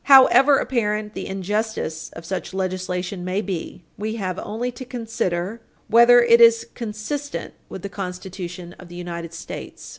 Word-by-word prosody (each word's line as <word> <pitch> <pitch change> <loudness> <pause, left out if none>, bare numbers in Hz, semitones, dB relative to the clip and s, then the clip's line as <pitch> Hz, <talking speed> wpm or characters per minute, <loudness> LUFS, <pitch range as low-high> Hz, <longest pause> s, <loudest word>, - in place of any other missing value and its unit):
However 275 +1 +8
apparent 215 -5 -1
the - - -5
injustice 195 -3 -2
of 165 - -10
such 190 +1 -4
legislation 185 -1 -2
may 185 +2 -1
be, 180 -3 -5 0.2
we 220 +2 -2
have 185 -4 -3
only 235 +4 -3
to 245 +2 -8
consider 225 -5 -3 0.3
whether 235 +1 +7
it 235 0 +6
is 230 -1 +7
consistent 245 +6 -4 0.2
with 190 - -8
the - - -2
Constitution 180 -2 -6
of 180 - -11
the 175 - -11
United 170 -1 -5
States. 165 - -8
205 Hz, 150 wpm, -23 LUFS, 180-230 Hz, 0.3 s, However